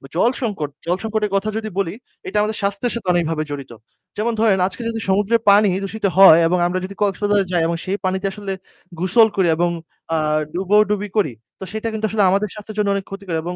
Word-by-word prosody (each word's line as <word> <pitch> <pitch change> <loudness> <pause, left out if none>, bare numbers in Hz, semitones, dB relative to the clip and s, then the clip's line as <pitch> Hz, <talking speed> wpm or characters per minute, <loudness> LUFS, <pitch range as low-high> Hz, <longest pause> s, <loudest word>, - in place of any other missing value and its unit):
জল 235 +7 +3
সংকট 200 - -2 0.2
জল 175 +2 0
সংকটের 215 -2 -1
কথা 205 +2 0
যদি 220 -1 -4
বলি 195 -3 -1 0.3
এটা 200 +3 -2
আমাদের 215 +1 -1
স্বাস্থ্যের 200 +4 -1
সাথে 215 -5 -6
অনেকভাবে 165 -2 0
জড়িত। 140 -4 -6 0.5
যেমন 230 +3 0
ধরেন 210 -4 +3
আজকে 195 +5 -8
যদি 225 -1 -3
সমুদ্রে 205 +4 +3
পানি 205 0 +5
দূষিত 210 +2 -4
হয় 190 -4 +9
এবং 180 +2 +1
আমরা 185 +1 -1
যদি 200 +1 -9
কক্সবাজার 205 0 +1
যাই 175 - +2
এবং 170 - -1
সেই 195 +2 -1
পানিতে 190 +1 -1
আসলে 195 -1 -5 0.5
গোসল 220 +5 +5
করি 190 -3 +2
এবং 175 0 +2 0.4
অ্যাঁ 155 -1 +1
ডুবোডুবি 205 +2 +2
করি; 175 -11 +2 0.3
তো - - -7
সেটা 220 +1 -4
কিন্তু 220 0 -2
আসলে 210 -2 +1
আমাদের 200 +3 +1
স্বাস্থ্যের 210 0 -10
জন্য 205 - +1
অনেক 195 - -3
ক্ষতিকর 195 -4 -5
এবং 175 +1 -4
200 Hz, 205 wpm, -20 LUFS, 180-210 Hz, 0.5 s, হয়